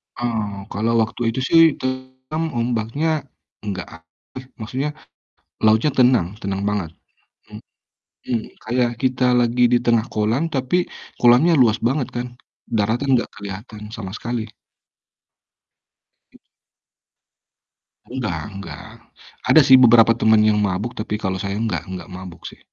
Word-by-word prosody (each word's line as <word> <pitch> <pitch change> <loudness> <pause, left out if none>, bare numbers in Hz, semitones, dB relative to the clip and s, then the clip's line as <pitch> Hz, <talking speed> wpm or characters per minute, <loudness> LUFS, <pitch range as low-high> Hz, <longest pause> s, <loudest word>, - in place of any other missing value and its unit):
Oh, 110 -5 -3
kalau 110 +4 0
waktu 110 +2 -6
itu, - - -1
sih, 165 - +7 0.2
tenang 130 +4 -4
ombaknya, 125 +7 -1 0.3
enggak, 100 -3 -5 0.7
maksudnya, 130 +6 -3 0.8
lautnya 110 +6 +4
tenang 125 -8 +4 0.2
tenang 95 0 -2
banget, 100 -6 -2 0.6
mmm - - -10 0.7
mmm, 115 -2 +1 0.2
kayak 120 +1 0
kita 130 -1 +1
lagi 120 +1 +2
di - - +6
tengah 115 -2 +2
kolam 110 +7 +1
tapi 135 +8 0 0.3
kolamnya 125 +8 +5
luas 115 -3 +4
banget, 135 +1 -1
kan. 120 +1 -2 0.5
Daratan 115 +6 0
enggak 120 - -1
kelihatan 105 +2 -8
sama 95 -4 -7
sekali. 120 -1 -4 1.9
Hmm. - - -18 1.7
Enggak 110 -11 -3
enggak, 95 0 -9 0.6
ada, 160 - +8
sih, 130 - +8
beberapa 115 -2 +7
teman 110 -1 +3
yang 105 -1 +3
mabuk, 100 +3 -1
tapi 105 0 -4
kalau 95 -2 -3
saya 100 0 -3
enggak 110 -1 -2
enggak 95 0 -8
mabuk, 90 -2 -10
sih. - - -9
115 Hz, 125 wpm, -21 LUFS, 105-125 Hz, 1.9 s, ada